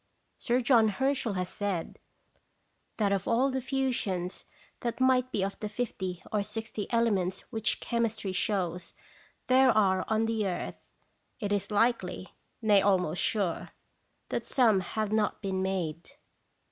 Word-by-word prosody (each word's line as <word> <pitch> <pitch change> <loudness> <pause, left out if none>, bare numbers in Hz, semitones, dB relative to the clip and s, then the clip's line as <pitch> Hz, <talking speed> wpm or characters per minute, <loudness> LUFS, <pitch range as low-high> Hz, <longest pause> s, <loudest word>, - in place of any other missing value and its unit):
Sir 245 +2 +1
John 235 -3 +5
Herschel 255 +1 0
has 180 -1 -2
said, 195 -5 -3 1.0
that 205 -3 +2
of 195 -2 0
all 255 +4 +3
the 260 0 -1
fusions 240 -9 -1 0.3
that 235 0 -3
might 255 -1 +3
be 200 - 0
of 195 +1 -3
the 210 - -4
fifty 190 -5 -4
or 210 - +1
sixty 215 0 -5
ele 230 -1 +3
ments 190 -1 -1
which 220 -1 +1
chemistry 225 -4 -1
shows 180 -2 -1 0.5
there 260 +1 +5
are 190 -5 +3
on 220 +1 +2
the 225 -2 0
earth, 180 - -4 0.6
it 205 -3 -1
is 200 -1 -1
likely 205 -4 0 0.3
nay, 205 -2 +5
almost 180 -4 +2
sure 195 -6 -1 0.6
that - - -2
some 225 -7 +3
have 210 +3 -3
not 215 -1 +1
been 190 -2 -2
made. 175 -4 -2
210 Hz, 145 wpm, -29 LUFS, 190-235 Hz, 1.0 s, John